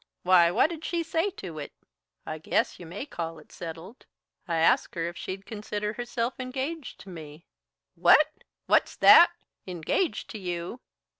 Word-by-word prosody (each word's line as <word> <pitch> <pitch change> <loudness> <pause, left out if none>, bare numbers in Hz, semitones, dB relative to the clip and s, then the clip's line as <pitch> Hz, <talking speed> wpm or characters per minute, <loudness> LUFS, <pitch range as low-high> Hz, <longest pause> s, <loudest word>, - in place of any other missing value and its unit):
Why, 180 -2 +6
what 245 - +3
did 325 -1 -7
she 340 0 -1
say 325 +4 0
to 165 -5 -7
it?" 145 - -7 0.5
"I 155 0 -5
guess 160 - 0
you 175 - -9
may 200 +10 -6
call 165 - -5
it 155 - -16
settled. 170 +7 -9 0.4
I 170 - -1
asked 165 +3 +2
her 165 -1 -1
if 170 - -6
she'd 190 +3 -6
consider 210 -1 -4
herself 240 +1 -3
engaged 265 +4 -5
to 195 - -12
me 155 -2 -10 0.3
" - - -62
"What? 305 - +6 0.4
What's - - +2
that? 345 - +8 0.4
Engaged 180 - -1
to 220 - -7
you?" 180 +5 -5
190 Hz, 165 wpm, -27 LUFS, 170-255 Hz, 0.5 s, that